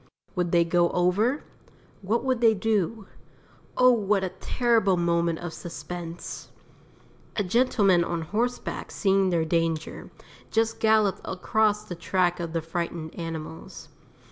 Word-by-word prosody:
Would 180 -3 -1
they 170 -1 +4
go 170 0 +3
over? 200 +10 +1 0.6
What 220 +5 0
would 260 -2 0
they 225 -2 +5
do? 210 0 -1 0.7
Oh, 255 0 +7
what 210 -4 +1
a 190 - -1
terrible 210 0 +1
moment 170 -1 +1
of 175 -1 -6
suspense. 170 +1 -7 0.9
A 210 - +1
gentleman 200 -3 +3
on 170 -1 -3
horseback 235 +9 -2
seeing 195 -2 +2
their 170 -2 +1
danger, 165 -1 -1 0.4
just 225 0 0
galloped 215 -3 +3
across 210 +2 +1
the 215 - -7
track 175 +1 0
of 170 -1 -4
the 165 -1 -2
frightened 165 -1 -4
animals. 165 -1 -7
180 Hz, 130 wpm, -26 LUFS, 170-220 Hz, 0.9 s, Oh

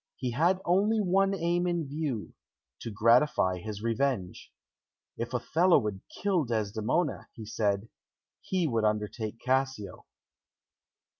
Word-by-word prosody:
He 125 -2 -3
had 170 +9 +2
only 205 +5 +3
one 195 0 +2
aim 175 0 0
in 170 -4 -1
view 140 -6 -3 0.5
to - - -6
gratify 115 -3 +3
his 105 +3 -6
revenge. 115 -5 -1 0.6
If 115 0 -4
Othello 160 +9 +3
would 105 -3 -2 0.2
kill 190 -5 +2
Desdemona, 115 - -1
he 110 - -9
said, 105 -1 -1 0.5
he 185 -2 -1
would 115 -5 0
undertake 105 +1 -1
Cassio. 130 -7 -1
125 Hz, 120 wpm, -29 LUFS, 110-170 Hz, 0.6 s, only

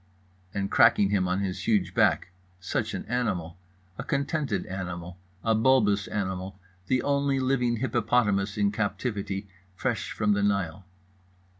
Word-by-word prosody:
and 100 0 -3
cracking 100 -1 +5
him 95 -3 +2
on 90 +2 0
his 95 0 -3
huge 95 -5 +2
back. 90 - +2 0.3
Such 90 - -2
an - - -5
animal! 95 -9 -2 0.4
A - - -2
contented 140 - -1
animal, 90 -1 -6 0.2
a 115 - +3
bulbous 110 -4 +3
animal; 95 -1 -3 0.3
the 130 -1 +1
only 140 -1 +1
living 125 -2 +1
hippopotamus 110 -4 +1
in 100 -1 +2
captivity, 100 -2 -2 0.3
fresh 120 +2 -2
from 105 -1 +1
the 100 - +1
Nile. 100 -3 0
100 Hz, 135 wpm, -27 LUFS, 95-120 Hz, 0.4 s, cracking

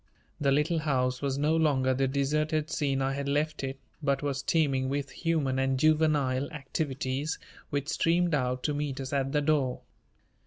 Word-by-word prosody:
The 140 -2 +2
Little 150 +4 +2
House 130 -4 0
was 140 -1 -1
no 150 +3 +2
longer 135 -5 +2
the 135 +1 +1
deserted 150 +3 0
scene 135 -2 0
I 135 0 0
had 140 0 -3
left 150 +1 0
it, 135 0 -3 0.2
but 140 -1 0
was 140 -2 -1
teeming 140 -4 +1
with 140 0 -2
human 150 -6 0
and 135 0 +1
juvenile 145 -3 +2
activities 140 0 -3 0.3
which 140 -1 -2
streamed 175 0 +2
out 125 -3 0
to 150 - 0
meet 145 -2 -3
us 135 0 -5
at 135 -1 0
the 150 - +2
door. 145 -4 +1
140 Hz, 170 wpm, -29 LUFS, 135-150 Hz, 0.3 s, The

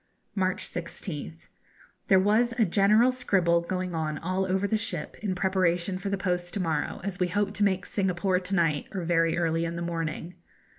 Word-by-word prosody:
March 185 -2 0
16th. 165 -2 -6 0.6
There 190 - +6
was 220 +5 +3
a 225 - +4
general 210 +7 +4
scribble 185 -9 +2
going 185 +1 -3
on 155 -2 -2
all 185 +2 -1
over 190 +2 +1
the 220 - +1
ship, 190 -8 -2
in 200 -3 -1
preparation 185 -1 +1
for 195 - -3
the 200 - -1
post 180 -2 -2
to - - -1
morrow, 160 -5 -1
as 195 0 -4
we 180 - +2
hope 205 +2 -1
to 210 - +1
make 190 -2 +1
Singapore 185 -1 0
to 185 +1 -3
night, 165 -5 +1
or 190 -3 -3
very 165 -1 +2
early 165 -1 +1
in 170 0 -3
the 170 - -4
morning. 165 0 -4
185 Hz, 190 wpm, -27 LUFS, 170-195 Hz, 0.6 s, There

